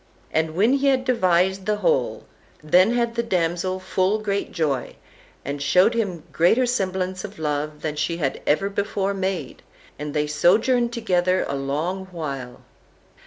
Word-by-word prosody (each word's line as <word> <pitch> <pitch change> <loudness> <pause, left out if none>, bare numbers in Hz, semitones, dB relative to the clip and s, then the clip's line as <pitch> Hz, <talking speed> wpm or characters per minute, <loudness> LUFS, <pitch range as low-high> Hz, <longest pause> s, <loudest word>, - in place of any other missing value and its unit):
And 160 0 0
when 215 +8 +3
he 280 0 +2
had 260 -1 +2
devised 190 -5 +2
the 210 - +2
whole, 485 - 0 0.4
then 185 +9 +4
had 235 -1 0
the 235 - 0
damsel 185 -3 -1
full 185 +2 0
great 200 -2 -2
joy, 145 -7 -2 0.5
and 140 +1 -4
showed 180 +9 +4
him 190 -8 -2
greater 200 +10 +3
semblance 190 -5 -2
of 210 -1 -8
love 150 0 -3
than 150 -1 -2
she 165 +2 -1
had 140 -5 -2
ever 155 +7 +2
before 200 0 -1
made, 190 -7 -3 0.4
and 150 0 -5
they 150 0 +2
sojourned 225 - +3
together 185 -5 +1
a 140 - -2
long 155 +8 -2
while. 140 -8 -6
185 Hz, 155 wpm, -23 LUFS, 155-210 Hz, 0.5 s, then